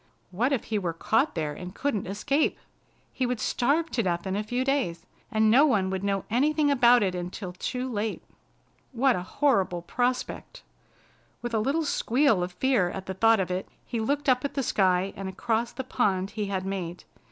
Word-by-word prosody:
What 235 Hz, +9 st, 0 dB
if 265 Hz, -6 st, 0 dB
he 215 Hz, -2 st, -1 dB
were 175 Hz, -4 st, -2 dB
caught 225 Hz, -, +1 dB
there 155 Hz, -3 st, -2 dB
and 180 Hz, +4 st, -8 dB
couldn't 245 Hz, -10 st, -1 dB
escape! 275 Hz, +10 st, 0 dB, 0.6 s
He 255 Hz, -, 0 dB
would 245 Hz, -2 st, -2 dB
starve 300 Hz, +10 st, +1 dB
to 240 Hz, -, +1 dB
death 175 Hz, -3 st, -1 dB
in 190 Hz, 0 st, -2 dB
a 205 Hz, -, 0 dB
few 245 Hz, +4 st, -2 dB
days, 270 Hz, -12 st, -1 dB, 0.3 s
and 220 Hz, 0 st, +3 dB
no 265 Hz, +5 st, +7 dB
one 195 Hz, -8 st, +1 dB
would 190 Hz, 0 st, -3 dB
know 195 Hz, -1 st, -1 dB
anything 290 Hz, +5 st, +2 dB
about 245 Hz, -3 st, +5 dB
it 190 Hz, -2 st, 0 dB
until 180 Hz, +1 st, -5 dB
too 250 Hz, +7 st, -3 dB
late. 220 Hz, -3 st, -3 dB, 0.7 s
What 255 Hz, +1 st, +3 dB
a -, -, -2 dB
horrible 190 Hz, -, +1 dB
prospect! 250 Hz, -, -2 dB, 0.8 s
With 240 Hz, -1 st, -4 dB
a 220 Hz, -, +2 dB
little 285 Hz, +9 st, 0 dB
squeal 255 Hz, -6 st, +2 dB
of 180 Hz, 0 st, -3 dB
fear 215 Hz, -3 st, +2 dB
at 190 Hz, +1 st, -6 dB
the 190 Hz, -, -4 dB
thought 225 Hz, +3 st, +4 dB
of 185 Hz, -1 st, -1 dB
it, 185 Hz, +1 st, -3 dB, 0.2 s
he 235 Hz, -, -3 dB
looked 285 Hz, +6 st, -1 dB
up 255 Hz, -1 st, +3 dB
at 280 Hz, -, -3 dB
the 275 Hz, -, 0 dB
sky 190 Hz, -3 st, +2 dB
and 195 Hz, 0 st, -5 dB
across 230 Hz, +3 st, -1 dB
the 265 Hz, -, -5 dB
pond 195 Hz, -7 st, 0 dB
he 210 Hz, -2 st, -3 dB
had 190 Hz, -1 st, -2 dB
made. 180 Hz, -3 st, -4 dB
220 Hz, 200 wpm, -27 LUFS, 190-255 Hz, 0.8 s, no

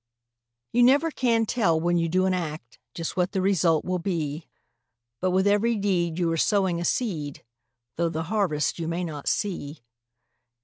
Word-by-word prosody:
You 245 Hz, -, +4 dB
never 280 Hz, +7 st, +4 dB
can 230 Hz, -5 st, +1 dB
tell 195 Hz, -9 st, +1 dB
when 175 Hz, +2 st, +1 dB
you 165 Hz, 0 st, 0 dB
do 185 Hz, +3 st, +2 dB
an 190 Hz, -, +2 dB
act 160 Hz, -3 st, -5 dB, 0.2 s
Just 165 Hz, -1 st, -4 dB
what 180 Hz, +1 st, 0 dB
the 195 Hz, -, 0 dB
result 175 Hz, -5 st, +2 dB
will 185 Hz, 0 st, -1 dB
be; 165 Hz, -4 st, -3 dB, 0.7 s
But 185 Hz, -, 0 dB
with 190 Hz, +1 st, +2 dB
every 210 Hz, +3 st, +3 dB
deed 180 Hz, -5 st, 0 dB
you 170 Hz, -2 st, +1 dB
are 165 Hz, -, 0 dB
sowing 185 Hz, -1 st, +1 dB
a -, -, -2 dB
seed, 160 Hz, -, -2 dB, 0.5 s
Though 170 Hz, 0 st, +1 dB
the 160 Hz, 0 st, -3 dB
harvest 170 Hz, -6 st, 0 dB
you 165 Hz, -, -3 dB
may 170 Hz, +2 st, -2 dB
not 150 Hz, -4 st, -6 dB
see. 160 Hz, -, -2 dB
175 Hz, 175 wpm, -25 LUFS, 165-200 Hz, 0.7 s, You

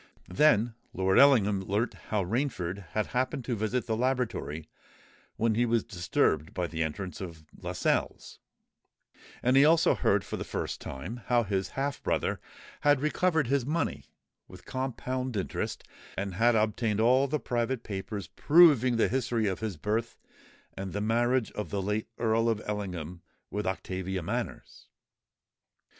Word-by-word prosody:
Then 120 Hz, -2 st, +4 dB, 0.2 s
Lord 95 Hz, 0 st, +3 dB
Ellingham 105 Hz, -8 st, +5 dB
learnt 100 Hz, +5 st, -1 dB, 0.2 s
how 105 Hz, -3 st, +1 dB
Rainford 100 Hz, -, -2 dB
had 110 Hz, -1 st, +1 dB
happened 130 Hz, +1 st, -1 dB
to 120 Hz, -, -1 dB
visit 110 Hz, +4 st, -1 dB
the 110 Hz, -, -1 dB
laboratory 115 Hz, -, -1 dB, 0.7 s
when 115 Hz, 0 st, +1 dB
he 115 Hz, +3 st, +2 dB
was 115 Hz, -1 st, +2 dB
disturbed 85 Hz, -5 st, 0 dB
by 90 Hz, -, 0 dB
the 80 Hz, -1 st, -4 dB
entrance 90 Hz, +5 st, -3 dB
of 85 Hz, -4 st, -8 dB
Lascelles; -, -, -2 dB, 1.0 s
and 125 Hz, +2 st, +3 dB
he 135 Hz, -, +7 dB
also 165 Hz, +2 st, +5 dB
heard -, -, +2 dB
for -, -, -4 dB
the -, -, -4 dB
first -, -, -4 dB
time 65 Hz, -, -6 dB
how 120 Hz, -1 st, +3 dB
his 95 Hz, -2 st, -1 dB
half 140 Hz, 0 st, -1 dB
brother -, -, 0 dB, 0.4 s
had 145 Hz, -2 st, +4 dB
recovered 160 Hz, +1 st, +1 dB
his 135 Hz, +1 st, +1 dB
money, 155 Hz, +6 st, -2 dB, 0.4 s
with 90 Hz, 0 st, -14 dB
compound 130 Hz, -1 st, -3 dB
interest, 95 Hz, -, -3 dB, 0.3 s
and 100 Hz, 0 st, -2 dB
had 115 Hz, +4 st, +3 dB
obtained 110 Hz, 0 st, +1 dB
all 130 Hz, +4 st, +4 dB
the 150 Hz, +2 st, -1 dB
private 120 Hz, 0 st, -1 dB
papers 100 Hz, 0 st, -5 dB
proving 145 Hz, -7 st, +5 dB
the 115 Hz, -, +3 dB
history 120 Hz, -3 st, 0 dB
of 95 Hz, -2 st, -1 dB
his 110 Hz, -6 st, -4 dB
birth 110 Hz, +8 st, -2 dB, 0.6 s
and 95 Hz, -1 st, -6 dB
the 105 Hz, -, -2 dB
marriage 120 Hz, +2 st, +1 dB
of 105 Hz, -, -5 dB
the 100 Hz, -, -2 dB
late 105 Hz, +3 st, -1 dB
Earl 115 Hz, 0 st, +2 dB
of 110 Hz, -2 st, 0 dB
Ellingham 90 Hz, -5 st, -4 dB, 0.3 s
with 105 Hz, -1 st, -2 dB
Octavia 95 Hz, -1 st, -3 dB
Manners. -, -, -5 dB
110 Hz, 150 wpm, -29 LUFS, 95-125 Hz, 1.0 s, he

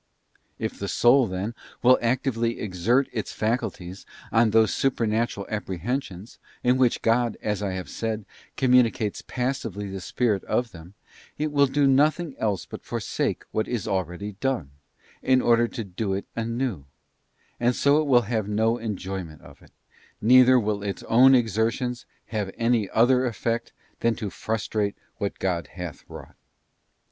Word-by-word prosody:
If -, -, -4 dB
the 100 Hz, -, -3 dB
soul, 120 Hz, +4 st, +4 dB
then, 95 Hz, +4 st, -3 dB, 0.3 s
will 125 Hz, +1 st, +6 dB
actively 120 Hz, -1 st, 0 dB
exert 110 Hz, +7 st, +1 dB
its 110 Hz, -, -3 dB
faculties 100 Hz, -5 st, -3 dB, 0.3 s
on 115 Hz, 0 st, +4 dB
those 110 Hz, 0 st, +4 dB
Supernatural 115 Hz, -5 st, 0 dB
Apprehensions, 105 Hz, -, -4 dB, 0.2 s
in 125 Hz, +1 st, +3 dB
which 125 Hz, -2 st, +2 dB
God, 115 Hz, 0 st, +2 dB
as 105 Hz, -1 st, -2 dB
I 100 Hz, -2 st, -2 dB
have 95 Hz, -1 st, -5 dB
said, 110 Hz, -2 st, -4 dB, 0.3 s
communicates 125 Hz, -5 st, +2 dB
passively 115 Hz, -6 st, -3 dB
the 95 Hz, -1 st, -5 dB
spirit 105 Hz, 0 st, 0 dB
of 120 Hz, -2 st, -1 dB
them, 85 Hz, +3 st, -13 dB, 0.4 s
it 150 Hz, 0 st, -1 dB
will 140 Hz, -1 st, +4 dB
do 140 Hz, +2 st, +2 dB
nothing 150 Hz, +3 st, +2 dB
else 105 Hz, -4 st, -1 dB
but -, -, -9 dB
forsake -, -, -2 dB
what 110 Hz, -, -1 dB
is 120 Hz, -5 st, -3 dB
already 95 Hz, +2 st, -2 dB
done, 130 Hz, -, -1 dB, 0.5 s
in 130 Hz, 0 st, +3 dB
order 120 Hz, -1 st, +3 dB
to 115 Hz, -, -5 dB
do 95 Hz, +1 st, -3 dB
it 95 Hz, -, -3 dB
anew; 115 Hz, -, -2 dB, 0.7 s
and 120 Hz, +1 st, +2 dB
so 145 Hz, +2 st, +3 dB
will 130 Hz, -5 st, +4 dB
have 110 Hz, -1 st, -2 dB
no 110 Hz, +3 st, +1 dB
enjoyment 95 Hz, -7 st, -5 dB
of -, -, -15 dB
it, -, -, -19 dB, 0.5 s
neither 125 Hz, +2 st, +6 dB
will 105 Hz, -2 st, -1 dB
its 100 Hz, -1 st, -4 dB
own 130 Hz, +3 st, +6 dB
exertions 115 Hz, +2 st, 0 dB, 0.2 s
have 105 Hz, -4 st, -2 dB
any 115 Hz, -4 st, +1 dB
other 125 Hz, +3 st, +4 dB
effect 115 Hz, 0 st, -2 dB, 0.3 s
than 115 Hz, -1 st, +1 dB
to 105 Hz, -5 st, -5 dB
frustrate 105 Hz, -2 st, -2 dB, 0.2 s
what 100 Hz, -, -3 dB
God 85 Hz, -5 st, -1 dB
hath -, -, -8 dB
wrought. -, -, -11 dB
115 Hz, 150 wpm, -25 LUFS, 100-125 Hz, 0.7 s, will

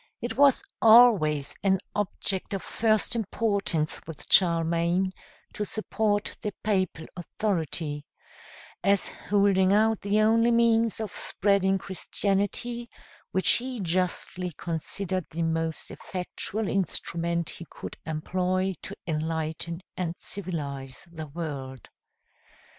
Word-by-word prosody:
It 235 Hz, -1 st, -4 dB
was 280 Hz, 0 st, +5 dB, 0.2 s
always 215 Hz, -, +6 dB
an 190 Hz, -1 st, +3 dB, 0.2 s
object 200 Hz, -1 st, -1 dB
of 190 Hz, -, -4 dB
first 220 Hz, +1 st, +2 dB
importance 200 Hz, -7 st, -1 dB
with 165 Hz, -3 st, -8 dB
Charlemagne 170 Hz, +1 st, +4 dB, 0.4 s
to 210 Hz, -, -2 dB
support 210 Hz, 0 st, -1 dB
the 210 Hz, -2 st, -4 dB
papal 185 Hz, -6 st, 0 dB
authority, 165 Hz, -5 st, -2 dB, 0.8 s
as 200 Hz, +1 st, +3 dB
holding 200 Hz, -2 st, +2 dB
out 220 Hz, +1 st, +3 dB
the 205 Hz, +1 st, +1 dB
only 230 Hz, +2 st, +4 dB
means 230 Hz, -1 st, +3 dB
of 220 Hz, -3 st, -5 dB
spreading 195 Hz, -1 st, +2 dB
Christianity, 205 Hz, +5 st, -1 dB, 0.4 s
which 190 Hz, -, 0 dB
he 250 Hz, 0 st, +1 dB
justly 180 Hz, 0 st, -1 dB
considered 175 Hz, +2 st, -2 dB
the 165 Hz, +1 st, -3 dB
most 165 Hz, 0 st, -1 dB
effectual 190 Hz, +3 st, -4 dB
instrument 170 Hz, -3 st, -1 dB
he 170 Hz, -, -10 dB
could -, -, -8 dB
employ 185 Hz, +4 st, -1 dB
to -, -, -7 dB
enlighten 160 Hz, +1 st, -3 dB
and 175 Hz, -2 st, -2 dB
civilize 140 Hz, -8 st, -5 dB
the 160 Hz, -2 st, -7 dB
world. 140 Hz, -5 st, -6 dB
185 Hz, 110 wpm, -27 LUFS, 165-210 Hz, 0.8 s, always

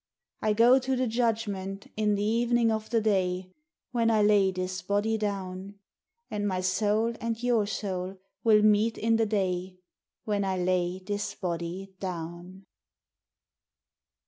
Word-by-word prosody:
I 215 Hz, -1 st, +2 dB
go 240 Hz, +4 st, +6 dB
to 260 Hz, +1 st, -1 dB
de 255 Hz, 0 st, +1 dB
judgment 220 Hz, -5 st, -1 dB
in 210 Hz, -1 st, +1 dB
de 200 Hz, -, -1 dB, 0.2 s
evenin' 240 Hz, -1 st, +2 dB
of 220 Hz, 0 st, -3 dB
de 230 Hz, -, +2 dB
day, 185 Hz, -3 st, 0 dB, 0.4 s
When 230 Hz, -2 st, +2 dB
I 215 Hz, -2 st, +3 dB
lay 205 Hz, -2 st, +4 dB
dis 185 Hz, 0 st, -3 dB
body 205 Hz, +3 st, 0 dB
down; 195 Hz, -2 st, -4 dB, 0.6 s
And 205 Hz, -1 st, -1 dB
my 185 Hz, -2 st, -1 dB
soul 210 Hz, +5 st, +1 dB
and 230 Hz, 0 st, -1 dB
your 235 Hz, -4 st, +2 dB
soul 190 Hz, -2 st, -4 dB, 0.3 s
will 215 Hz, -2 st, +5 dB
meet 215 Hz, +2 st, +3 dB
in 225 Hz, 0 st, +2 dB
de 225 Hz, -1 st, +2 dB
day 185 Hz, -3 st, -1 dB, 0.5 s
When 205 Hz, -2 st, 0 dB
I 190 Hz, -1 st, -1 dB
lay 180 Hz, 0 st, 0 dB
dis 205 Hz, +2 st, -4 dB
body 180 Hz, +2 st, -4 dB
down. 175 Hz, +1 st, -6 dB
205 Hz, 145 wpm, -28 LUFS, 185-220 Hz, 0.6 s, go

